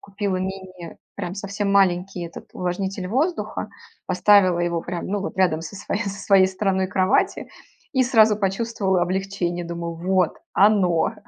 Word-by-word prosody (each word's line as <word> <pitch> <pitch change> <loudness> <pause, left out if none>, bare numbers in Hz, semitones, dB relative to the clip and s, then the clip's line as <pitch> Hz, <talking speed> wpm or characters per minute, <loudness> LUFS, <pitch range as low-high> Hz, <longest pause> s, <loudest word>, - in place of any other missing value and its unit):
купила 200 -1 -3
мини, 185 -2 -6 0.2
прям 180 -2 -4
совсем 200 0 -3
маленький 185 -1 +2
этот, 170 - -11
увлажнитель 185 +1 -3
воздуха. 300 - -1 0.4
Поставила 195 -4 +4
его 170 -1 0
прям, 175 0 -5
ну, 205 +1 -1
вот 195 - -5
рядом 175 -4 +2
со 165 - -8
своей 200 +2 -3
со 200 0 -5
своей 195 -2 +5
стороной 190 -1 0
кровати- 185 +1 +1 0.4
и 260 -2 +3
сразу 220 -4 +5
почувствовала 195 -2 0
облегчение: 180 -1 -2
думаю 170 0 -5
вот- 180 0 +1 0.2
оно. 190 -5 +3
190 Hz, 145 wpm, -23 LUFS, 180-200 Hz, 0.4 s, своей